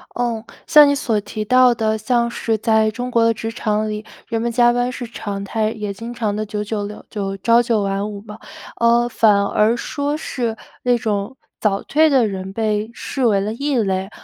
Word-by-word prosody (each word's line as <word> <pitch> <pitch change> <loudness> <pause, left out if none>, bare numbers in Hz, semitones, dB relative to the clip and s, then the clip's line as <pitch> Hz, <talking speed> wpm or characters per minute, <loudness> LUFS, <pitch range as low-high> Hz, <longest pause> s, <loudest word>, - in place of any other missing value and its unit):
哦， 235 -2 -2 0.2
像 300 -1 +8
你 285 - +3
所 225 -6 0
提 215 +1 -5
到 255 +2 +5
的， 220 -1 0
像 235 +2 +1
是 225 -1 -1
在 220 0 +2
中 245 +3 -5
国 230 -2 +3
的 230 - +4
职 225 0 -5
场 215 -2 -1
里， 210 0 -4 0.2
人 225 -1 -2
们 235 - 0
加 240 0 +4
班 245 +1 0
是 250 -1 -6
常 205 -3 -5
态， 215 +1 -1
也 210 -2 -4
经 230 +4 -7
常 220 -4 -2
地 215 +1 -2
九 210 0 -4
九 210 0 -3
六 210 +1 -8
就 195 -2 -4
朝 230 +4 +4
九 230 -3 +1
晚 200 +1 -2
五 205 -1 -7
吧， 210 +1 -11 0.4
呃， 235 +1 +4
反 210 -4 +3
而 215 +3 +2
说 285 +4 -2
是 240 -7 -3 0.3
那 245 -1 +2
种 215 +1 -2 0.2
早 200 -2 +1
退 315 +1 +3
的 260 -5 +4
人， 190 -2 -5
被 215 0 -1
视 260 +2 -4
为 210 -3 +3
了 205 +2 -2
异 280 +3 -1
类。 195 -3 0
225 Hz, 225 characters per minute, -20 LUFS, 210-240 Hz, 0.4 s, 像